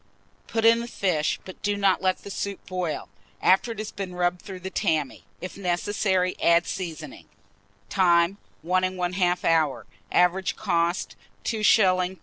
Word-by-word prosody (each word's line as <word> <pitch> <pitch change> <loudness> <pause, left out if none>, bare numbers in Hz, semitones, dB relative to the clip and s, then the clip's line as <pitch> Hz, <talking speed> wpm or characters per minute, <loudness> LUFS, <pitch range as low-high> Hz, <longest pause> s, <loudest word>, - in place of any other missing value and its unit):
Put 225 -1 -1
in 230 0 +6
the 235 - -5
fish, 175 -9 0
but 185 - -11
do 205 0 0
not 195 -2 +2
let 185 -1 0
the 200 - -8
soup 200 0 -4
boil, 180 -4 -3 0.3
after 195 +5 +3
it - - -16
has 215 0 -5
been 190 -3 -6
rubbed 175 0 0
through 190 -2 -9
the 190 +1 -6
tammy. 160 -9 -1 0.2
If 185 +2 -7
necessary, 185 0 0
add 170 +1 +4
seasoning. 170 -5 -6 0.6
Time. 175 0 +3 0.2
1 185 +2 +2 0.2
1/2 180 0 0
hour. 160 -4 +2 0.3
Average 180 +2 +2
cost, 175 -3 -1 0.3
2s. 225 - -1
3d. 185 -4 +3
185 Hz, 150 wpm, -25 LUFS, 175-200 Hz, 0.6 s, in